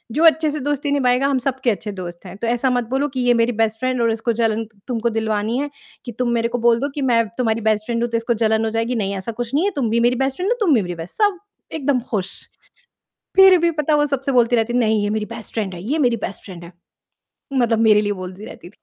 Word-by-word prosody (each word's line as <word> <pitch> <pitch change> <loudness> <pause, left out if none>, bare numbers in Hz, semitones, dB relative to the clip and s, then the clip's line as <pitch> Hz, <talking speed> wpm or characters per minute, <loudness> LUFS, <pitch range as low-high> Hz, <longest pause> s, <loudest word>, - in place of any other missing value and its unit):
जो 320 - +2
अच्छे 320 -1 +5
से 300 - -4
दोस्ती 290 +1 -2
निभाएगा 260 -1 +2
हम 275 -2 +1
सब 265 +1 -2
के 245 - +3
अच्छे 210 +1 -4
दोस्त 175 0 -8
हैं। 185 - -9
तो 230 - -3
ऐसा 245 +2 +1
मत 245 -1 +1
बोलो 270 +3 0
कि 260 -1 -5
ये 245 - +6
मेरी 230 +1 +2
बेस्ट 220 0 0
फ्रेंड 255 -1 -1
और 230 -1 +2
इसको 225 +1 -1
जलन 225 0 +1 0.2
तुमको 235 -1 -1
दिलवानी 220 +1 -1
है 290 +1 -2 0.4
कि 240 - -5
तुम 250 -1 +1
मेरे 230 0 +1
को - - +1
बोल 230 0 +4
दो 280 +2 -2
कि 285 - -3
मैं 230 0 +4
तुम्हारी 230 -2 0
बेस्ट 215 0 0
फ्रेंड 235 -1 -1
हूँ 240 - -1
तो 230 - +1
इसको 230 +1 0
जलन 220 0 +2
हो - - 0
जाएगी, 230 +2 -1
नहीं 200 -2 -1
ऐसा 210 +5 -5
कुछ 240 +3 -6
नहीं 320 +7 +2
है 405 - +1
तुम 245 -6 0
भी 230 +1 +1
मेरी 250 - +1
बेस्ट 270 +1 -1
फ्रेंड 370 +4 -1
हो - - +1
तुम 315 - +4
भी 225 - +4
मेरी 175 -1 -5
बेस" 165 +1 -9
सब 405 -4 +2 0.3
एकदम 280 -4 0
खुश। 195 -4 -2 1.0
फिर 385 -1 +8
भी 340 - +3
पता 300 -1 0
वो 295 0 +3
सबसे 275 -1 -2
बोलती 245 -1 +3
रहती 230 +1 0
है, 245 - +2
"नहीं 220 -2 +2
ये 205 - 0
मेरी 215 0 -1
बेस्ट 225 - -10
फ्रेंड 205 -5 -2
है 170 - -8
ये 285 +9 -1
मेरी 235 -1 +2
बेस्ट 195 - -8
फ्रेंड 175 -4 -10
है।" 170 - -11 0.8
मतलब 240 -4 +2
मेरे 210 0 +6
लिए 205 -1 -1
बोलती 185 +3 -8
रहती 175 - -11
थी। - - -29
235 Hz, 275 wpm, -20 LUFS, 220-270 Hz, 1.0 s, फिर